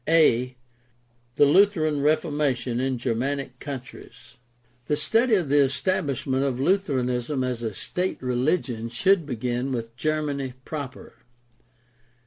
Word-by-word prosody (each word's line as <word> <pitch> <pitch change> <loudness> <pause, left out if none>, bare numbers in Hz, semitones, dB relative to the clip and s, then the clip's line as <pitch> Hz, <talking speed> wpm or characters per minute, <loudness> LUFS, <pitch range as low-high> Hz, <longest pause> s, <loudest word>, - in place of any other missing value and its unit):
A. 125 -6 +4 0.8
THE 145 - +6
LUTHERAN 155 -3 +3
REFORMATION 145 -5 0
IN 130 0 0
GERMANIC 130 +2 -2
COUNTRIES 120 -3 -9 0.5
The 150 - +1
study 225 +9 +3
of 175 -8 0
the 145 +1 +4
establishment 135 -1 0
of 130 -3 -1
Lutheranism 135 -6 0
as 125 -2 -2
a 110 -4 -4
state 180 - -3
religion 125 -2 -1
should 170 +7 +2
begin 125 +1 -2
with 115 -2 -4
Germany 140 -1 -2
proper. 145 -4 -7
135 Hz, 115 wpm, -25 LUFS, 125-155 Hz, 0.8 s, THE